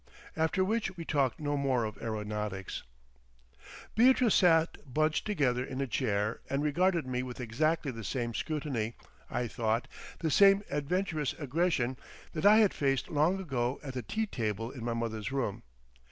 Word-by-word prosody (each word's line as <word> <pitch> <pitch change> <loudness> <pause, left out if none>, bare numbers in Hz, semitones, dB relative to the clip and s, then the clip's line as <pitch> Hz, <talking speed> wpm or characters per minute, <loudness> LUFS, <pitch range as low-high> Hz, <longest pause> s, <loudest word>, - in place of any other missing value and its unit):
After 160 +4 +1
which 215 -2 -1
we 165 - -6
talked 140 -6 +1
no 145 -1 -1
more 135 -4 +1
of 110 0 -5
aeronautics. 105 -3 -4 1.1
Beatrice 245 -1 +5
sat 165 -5 +3
bunched 155 +6 +1
together 130 -11 +1
in 130 0 -5
a 140 - +1
chair 110 -4 -1
and 140 +1 0
regarded 170 +2 +2
me 125 -1 -2
with 125 0 -7
exactly 145 +5 0
the 115 -2 -8
same 120 +2 -2
scrutiny, 130 -7 -2 0.3
I 120 - -1
thought, 115 +1 -1 0.3
the 160 -2 -1
same 195 +4 +6
adventurous 155 +1 -1
aggression, 145 -4 0 0.4
that 155 +4 +2
I 210 +1 +8
had 215 -3 +5
faced 135 -2 0
long 160 +5 +2
ago 130 -7 -1
at 135 -3 -6
the 125 - -3
tea 220 - -2
table 115 - -3
in 125 -4 -8
my 120 0 -1
mother's 115 0 -3
room. 130 -7 -2
140 Hz, 160 wpm, -31 LUFS, 120-165 Hz, 1.1 s, I